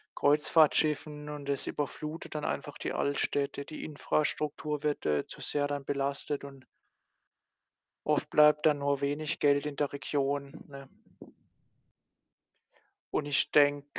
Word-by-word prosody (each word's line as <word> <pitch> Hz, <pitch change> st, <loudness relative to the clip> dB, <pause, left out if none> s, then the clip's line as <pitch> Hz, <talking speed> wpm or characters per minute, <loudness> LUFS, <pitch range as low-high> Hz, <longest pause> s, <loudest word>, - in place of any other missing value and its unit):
Kreuzfahrtschiffen 150 Hz, 0 st, +3 dB
und 145 Hz, -1 st, -6 dB
das 140 Hz, -1 st, -2 dB
überflutet 150 Hz, +2 st, -5 dB
dann 150 Hz, -, -2 dB
einfach 145 Hz, 0 st, -3 dB
die -, -, -3 dB
Altstädte. 140 Hz, 0 st, -1 dB
Die 155 Hz, -, -8 dB
Infrastruktur 150 Hz, 0 st, -1 dB
wird, 150 Hz, -1 st, -1 dB
äh, 75 Hz, -1 st, +1 dB
zu -, -, -11 dB
sehr 145 Hz, -1 st, -1 dB
dann 145 Hz, -1 st, -4 dB
belastet 140 Hz, +1 st, -2 dB
und 135 Hz, -2 st, -11 dB, 1.4 s
oft -, -, +1 dB
bleibt 150 Hz, 0 st, +5 dB
dann 150 Hz, -2 st, +4 dB
nur 140 Hz, 0 st, +1 dB
wenig 145 Hz, +2 st, -1 dB
Geld 145 Hz, 0 st, +3 dB
in 150 Hz, -, -4 dB
der 145 Hz, -1 st, -1 dB
Region, 140 Hz, -1 st, -1 dB, 0.2 s
ne? 140 Hz, -1 st, -11 dB, 2.2 s
Und 145 Hz, -, 0 dB
ich 145 Hz, -1 st, +1 dB
denke 145 Hz, -1 st, +4 dB
145 Hz, 130 wpm, -30 LUFS, 140-150 Hz, 2.2 s, bleibt